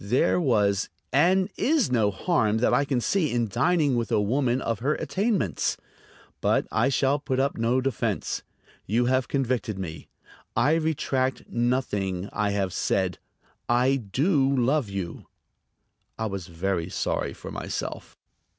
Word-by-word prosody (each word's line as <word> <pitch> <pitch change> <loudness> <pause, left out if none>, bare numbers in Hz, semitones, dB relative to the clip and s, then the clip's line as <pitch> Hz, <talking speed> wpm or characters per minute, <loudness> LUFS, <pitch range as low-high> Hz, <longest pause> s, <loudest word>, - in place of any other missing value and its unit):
There 125 - +2
was 105 - +2 0.2
and 185 +7 +4
is 295 - +2
no 110 -4 +3
harm 110 - +1
that 120 - +2
I 140 - +3
can 135 -3 0
see 165 +5 +1
in 120 -1 +1
dining 140 - +2
with 120 0 -1
a 110 - +3
woman 120 +4 +1
of 115 -5 -2
her 145 +5 +1
attainments. 195 - 0 0.6
But - - +2
I 115 +4 +2
shall 135 +2 +2
put 130 -2 -2
up 140 +1 +1
no 120 +3 +1
defense. 130 -7 -1 0.5
You 115 +5 +2
have 130 0 +1
convicted 125 -6 -1
me. 85 -4 -6 0.5
I 150 - +3
retract 140 -5 0
nothing 105 -6 -1
I 105 -1 0
have 100 -3 -1
said. - - 0 0.5
I 125 +3 +3
do 135 - +1
love 130 -1 +1
you." 95 -4 -5 0.9
I 110 - -2
was 100 -4 -4
very 85 0 -2
sorry - - -2
for - - -9
myself. - - -5
125 Hz, 145 wpm, -26 LUFS, 105-140 Hz, 0.9 s, and